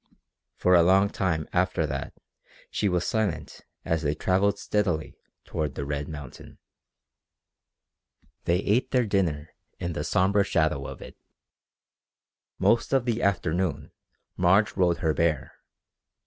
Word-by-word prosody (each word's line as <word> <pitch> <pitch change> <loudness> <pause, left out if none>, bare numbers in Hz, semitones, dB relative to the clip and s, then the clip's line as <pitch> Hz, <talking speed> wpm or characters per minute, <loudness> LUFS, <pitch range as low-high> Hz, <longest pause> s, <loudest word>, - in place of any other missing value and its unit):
For 90 - +2
a 85 - +7
long 95 +4 +4
time 80 -5 -1
after 90 -2 +1
that 70 -2 -5 0.6
she 105 - 0
was 90 -1 0
silent 90 -7 -2 0.2
as 80 -1 0
they 75 -1 0
travelled 95 +5 +1
steadily 90 -7 -1 0.3
toward 75 -4 -3
the 70 - -4
red 70 0 -3
mountain. 75 -5 -10 1.9
They 85 +2 +2
ate 115 +6 +1
their 125 -2 +2
dinner 80 -7 -1 0.3
in 85 -1 -3
the - - -3
sombre 100 +2 +2
shadow 80 -8 0
of - - -8
it. - - -12 1.4
Most 115 +3 +2
of 135 -3 +3
the 120 -1 0
afternoon 90 -3 -1 0.5
Marge 95 +4 +3
rode 90 -3 +2
her 80 - +3
bear. 75 -3 0
90 Hz, 130 wpm, -26 LUFS, 80-100 Hz, 1.9 s, a